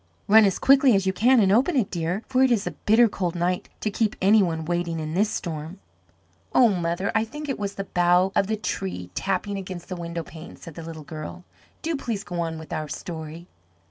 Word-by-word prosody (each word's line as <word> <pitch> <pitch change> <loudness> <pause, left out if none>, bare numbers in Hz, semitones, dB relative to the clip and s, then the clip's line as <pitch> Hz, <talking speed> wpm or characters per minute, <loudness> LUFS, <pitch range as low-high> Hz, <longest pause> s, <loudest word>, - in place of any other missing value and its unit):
"Run 215 +1 +7
as 195 - +1
quickly 270 -3 +5
as 195 -1 +1
you 190 - +1
can 245 +6 +4
and 195 -3 +4
open 260 - +3
it, 240 -8 +1
dear, 175 +4 -2
for 260 0 +1
it 265 - +5
is 225 -4 +1
a - - -2
bitter 230 +3 +4
cold 180 -4 -3
night 180 +1 -1
to 215 - -1
keep 215 0 0
any 205 +3 +5
one 165 -4 -1
waiting 170 -1 -2
in 155 0 -4
this 205 +4 +2
storm." 165 +1 -5 0.8
"Oh, 245 -2 +7
mother, 175 0 -1
I 220 - +2
think 295 +7 -7
it 275 - -3
was 200 -1 -3
the 195 - -3
bough 180 0 +2
of 195 - +2
the 220 +1 -1
tree 90 - -4
tapping 195 - -2
against 185 -2 -8
the 185 - -3
window 170 -1 -5
pane," 160 +1 -11
said 165 - -11
the 165 - -8
little 160 -1 -8
girl. 155 +4 -8 0.4
"Do 330 -1 -1
please 230 -7 -3
go 175 -4 -5
on 165 -1 -2
with 160 0 -8
our 155 -2 -3
story." 160 +2 -7
185 Hz, 225 wpm, -24 LUFS, 165-215 Hz, 0.8 s, Run